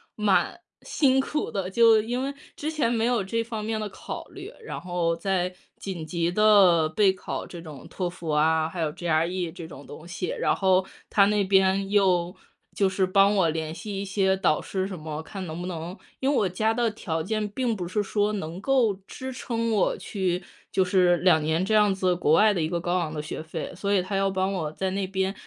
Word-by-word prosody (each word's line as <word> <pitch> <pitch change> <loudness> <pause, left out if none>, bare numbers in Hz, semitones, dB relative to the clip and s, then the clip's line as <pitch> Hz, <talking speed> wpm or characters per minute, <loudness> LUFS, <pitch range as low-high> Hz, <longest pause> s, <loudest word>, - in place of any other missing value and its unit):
蛮 210 -2 +1 0.2
辛 265 -3 +2
苦 300 +3 -2
的。 190 -2 -3
就 225 +1 +5
因 245 +4 -2
为 275 - -3 0.2
之 310 +2 -3
前 285 -7 0
没 230 -1 +1
有 240 -4 +1
这 230 +4 -1
方 225 -2 -5
面 220 0 -2
的 210 - -3
考 - - -7
虑， - - -9
然 - - -6
后 175 -2 -1
在 180 +1 -1 0.2
紧 185 -5 -6
急 170 +1 -1
地 190 -6 +5
备 190 +4 +3
考 185 - -5
这 170 -2 -9
种 150 -5 -10
托 180 -2 -3
福 170 -2 -8
啊， 155 +1 +2
还 170 +2 -7
有 155 -2 0
GRE 170 +2 -1
这 170 -2 -8
种 145 -3 -11
东 160 +3 -11
西。 175 +1 -4
然 - - 0
后 190 -1 +3 0.2
他 200 -1 +4
那 205 0 +2
边 195 0 +2
又 180 -3 +2 0.4
就 195 -2 +2
是 190 0 +1
帮 195 +2 +4
我 190 -4 +3
联 160 0 -3
系 195 +2 -5
一 - - -3
些 190 -1 +1
导 190 -5 +2
师 190 -1 -3
什 190 -2 -6
么， 155 -1 -5
看 190 +4 -7
能 165 0 -6
不 180 - -4
能 170 0 -5 0.2
因 265 - -1
为 - - +1
我 205 -7 +2
家 220 +5 0
的 235 0 +1
条 165 -6 -3
件 215 +4 -2
并 235 +2 -1
不 180 -4 -4
是 195 +4 0
说 205 +1 0
能 175 -3 -5
够 240 -4 +2
支 260 +5 -7
撑 230 -2 -2
我 210 -4 +2
去 185 -3 -2 0.3
就 190 -1 +2
是 180 -2 +3
2 175 -3 +4
年 160 +4 0
这 215 - -1
样 210 -2 +5
子 185 -2 +1
国 155 -3 +2
外 210 +5 +5
的 180 - -1
一 155 - -1
个 170 - -1
高 175 +1 0
昂 165 -3 -2
的 150 - -4
学 150 - -6
费。 160 +2 -6
所 200 +3 -2
以 200 - +4
他 190 +2 -4
要 195 0 +2
帮 190 0 -1
我 160 -5 -2
在 190 +4 -2
那 195 0 -2
边 190 0 -1
190 Hz, 245 characters per minute, -26 LUFS, 170-210 Hz, 0.4 s, 就